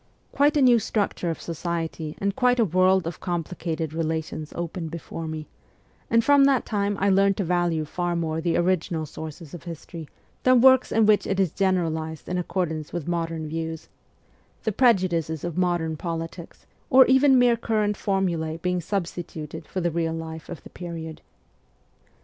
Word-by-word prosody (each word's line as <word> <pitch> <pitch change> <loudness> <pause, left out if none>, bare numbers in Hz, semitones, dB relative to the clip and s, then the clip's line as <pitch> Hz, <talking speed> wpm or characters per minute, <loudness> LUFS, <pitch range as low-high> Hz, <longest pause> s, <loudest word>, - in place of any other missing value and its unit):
Quite 290 +1 +3
a 285 - +4
new 245 -2 +6
structure 205 -4 -1
of 165 - -3
society 165 -2 -4
and 200 0 -1
quite 250 -1 +3
a 230 - +5
world 185 0 +3
of 165 0 -5
complicated 165 -2 -3
relations 160 -1 -3
opened 170 -1 -4
before 165 0 -6
me; 155 -1 -5 0.6
and 230 0 +4
from 285 +1 +6
that 275 -2 +3
time 205 -1 -1
I 200 - +2
learned 195 0 +3
to 200 - 0
value 175 -2 0
far 175 +3 -2
more 160 -1 -1
the 170 0 +1
original 170 -2 0
sources 155 0 -9
of 175 - -7
history 165 -1 -8 0.3
than 255 -1 +5
works 260 +1 +6
in 225 -1 +4
which 210 -1 +3
it 195 0 -1
is 190 -5 +2
generalized 160 -5 -1
in 180 0 -1
accord 180 -1 -1
ance 155 -1 -6
with 175 -3 -4
modern 165 -2 -2
views 160 0 -5 0.7
the 220 - 0
prejudices 180 - +2
of 175 -2 -4
modern 175 -3 0
politics, 165 +1 -6 0.2
or 260 0 +8
even 265 +1 +5
mere 245 -1 +5
current 215 -2 0
formulae 175 -6 -1
being 180 +1 -1
substi 175 0 -3
tuted 160 0 -8
for 185 - -3
the 175 0 0
real 165 0 -1
life 160 -1 -7
of 175 - -8
the - - -13
period. 165 -3 -7
175 Hz, 175 wpm, -25 LUFS, 160-195 Hz, 0.7 s, or